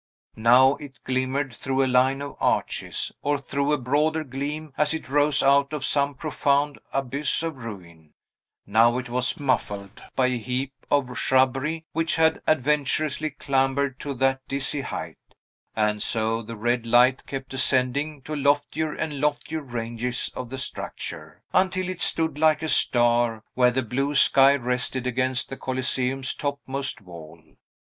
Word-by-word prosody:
Now 125 +5 +5
it 145 -2 -11
glimmered 130 +1 -1
through 135 +4 -1
a - - +2
line 130 +2 +2
of 145 - -7
arches, - - 0
or 145 0 0
threw 140 +2 -2
a 150 - +3
broader 150 +5 0
gleam 145 +2 -5
as 150 +1 +1
it 160 - -7
rose 145 0 +3
out 140 +1 +3
of 145 -3 -2
some 140 0 +1
profound 145 0 0
abyss 135 +3 -1
of 165 -4 -4
ruin; 85 -10 -11 0.5
now 115 +4 +4
it 125 -1 -5
was 125 0 -1
muffled 105 -7 -2
by 130 - +3
a 125 -1 0
heap 130 +4 -3 0.2
of 130 -4 +1
shrubbery 135 +5 +1
which 165 +1 0
had 160 0 +2
adventurously 150 +1 +1
clambered 135 -1 0
to 140 -2 -5
that 135 +1 +1
dizzy 140 +1 -1
height; - - -6 0.6
and 105 -1 0
so 115 0 0
the 115 +1 -8
red 120 +2 -1
light 125 +2 +4
kept 135 -1 -6
ascending 135 +2 +1
to 155 - -5
loftier 145 +2 0
and 150 -3 -4
loftier 150 +2 -1
ranges 120 -1 -3
of 125 - -6
the 135 - -5
structure, 130 - -5
until 185 0 +1
it 185 -1 -5
stood 160 -3 0
like 155 0 +3
a 160 - -1
star 120 -4 +3
where 125 -1 +4
the 130 +2 -1
blue 135 +6 -2
sky 140 0 +6
rested 125 0 -1
against 130 +1 0
the 135 - -6
Coliseum's 130 0 -1
topmost 140 -3 -3
wall. 85 -3 -12
135 Hz, 155 wpm, -24 LUFS, 125-145 Hz, 0.6 s, sky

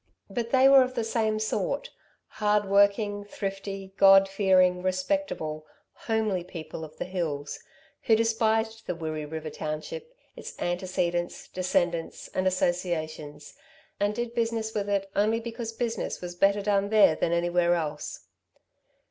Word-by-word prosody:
But 230 +2 -2
they 265 +1 +5
were 270 -1 +8
of 255 0 -1
the 235 - 0
same 220 -1 0
sort - - -2 0.3
hardworking, 205 0 +2
thrifty, 195 -1 -6
God 195 0 +7
fearing, 185 -2 +3
respectable, 185 - -2 0.3
homely 215 -5 -1
people 165 -2 -8
of 155 0 -10
the - - -3
hills, 160 -6 -3 0.5
who 225 - +5
despised 225 0 0
the 180 - -2
Wirree 155 -2 -4
River 155 0 -6
township, 165 - -5 0.2
its - - -9
antecedents, 175 -1 -2
descendants, 175 -2 -1
and 185 0 -1
associations, 155 -5 -2 0.5
and 205 +1 +1
did 240 0 -3
business 225 -2 -1
with 205 -1 -2
it 200 -1 0
only 215 +3 +2
because 230 0 -5
business 230 -1 -3
was 175 -1 -6
better 200 +3 +2
done 200 -1 +1
there 210 -6 +6
than 165 - 0
anywhere 175 0 +2
else. 150 -3 -4
195 Hz, 135 wpm, -27 LUFS, 175-220 Hz, 0.5 s, were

